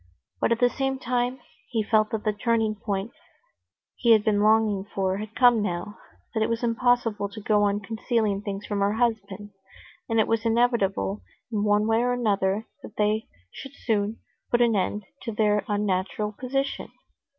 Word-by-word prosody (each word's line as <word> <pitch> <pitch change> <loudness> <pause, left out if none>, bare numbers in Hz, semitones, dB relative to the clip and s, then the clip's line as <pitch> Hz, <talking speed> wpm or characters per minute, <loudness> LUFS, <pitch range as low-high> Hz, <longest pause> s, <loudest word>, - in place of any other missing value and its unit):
But - - +1
at 230 - +3
the 245 - +5
same 270 +2 -1
time, 250 0 -1 0.3
he 225 -3 0
felt 215 0 +2
that 220 -1 -3
the 215 - +1
turning 225 0 +1
point 205 0 -3 0.8
he 235 -2 +4
had 215 -2 +4
been 205 -1 +2
longing 215 -2 +3
for 195 -1 -2
had 215 +1 -7
come 245 -3 +5
now; 195 +2 -4 0.3
that 220 - -1
it 220 - +1
was 230 +1 -2
impossible 230 -3 +1
to 205 - -9
go 210 0 +2
on 205 0 +1
concealing 220 -1 -1
things 200 0 -5
from 205 -1 -2
her 200 +1 +2
husband, 210 -3 -2 0.6
and 225 0 +2
it 220 - +3
was 225 0 0
inevitable 225 - +1 0.3
in 210 -2 0
one 210 0 +3
way 225 +1 +2
or 245 0 +1
another 205 -3 0 0.2
that - - -11
they 215 +1 +1 0.2
should 275 +1 -10
soon 215 -2 -1 0.3
put 240 - +2
an 235 -2 +3
end 200 +1 -1 0.2
to 230 - -4
their 210 -1 +2
unnatural 205 0 -1
position. 270 +5 -3
215 Hz, 175 wpm, -25 LUFS, 205-230 Hz, 0.8 s, the